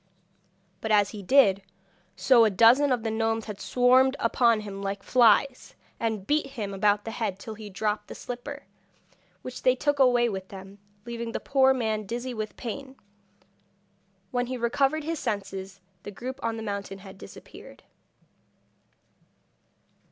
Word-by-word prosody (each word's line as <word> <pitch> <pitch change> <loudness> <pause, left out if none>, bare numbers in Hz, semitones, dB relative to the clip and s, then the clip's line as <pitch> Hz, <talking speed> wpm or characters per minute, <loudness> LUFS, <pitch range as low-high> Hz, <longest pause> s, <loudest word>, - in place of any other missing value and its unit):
But 220 - -3
as 205 -1 +3
he 210 - -8
did 200 -3 +4 0.5
so 255 -3 +5
a 220 - +4
dozen 235 +8 +5
of 245 -3 0
the 225 - -1
gnomes 225 0 -1
had 210 -2 -8
swarmed 255 +2 +4
upon 230 -1 +2
him 200 -2 -7
like 195 0 -4
flies, 250 +2 +3 0.2
and 220 -4 -2
beat 295 +2 +1
him 220 -7 -6
about 205 +1 +1
the 225 - -4
head 220 -5 -3
till 220 +2 -8
he 215 -1 -10
dropped 210 +1 -2
the - - -9
slipper, 280 +4 -7 0.8
which 255 0 -7
they 255 0 +3
took 290 +2 0
away 245 -2 +4
with 190 -4 -5
them, 195 +1 -11 0.3
leaving 235 -1 -5
the - - -2
poor 265 -1 +3
man 220 -5 -1
dizzy 245 +4 -4
with 215 -2 -6
pain. 265 +3 -7 1.4
When 245 0 -1
he 255 0 -4
recovered 275 +5 0
his 325 0 -3
senses 195 -4 -5 0.2
the - - -8
group 255 +6 -7
on 230 0 -2
the 225 - -6
mountain 200 -2 -5
had 190 0 -12
disappeared. - - -13
225 Hz, 155 wpm, -26 LUFS, 205-255 Hz, 1.4 s, so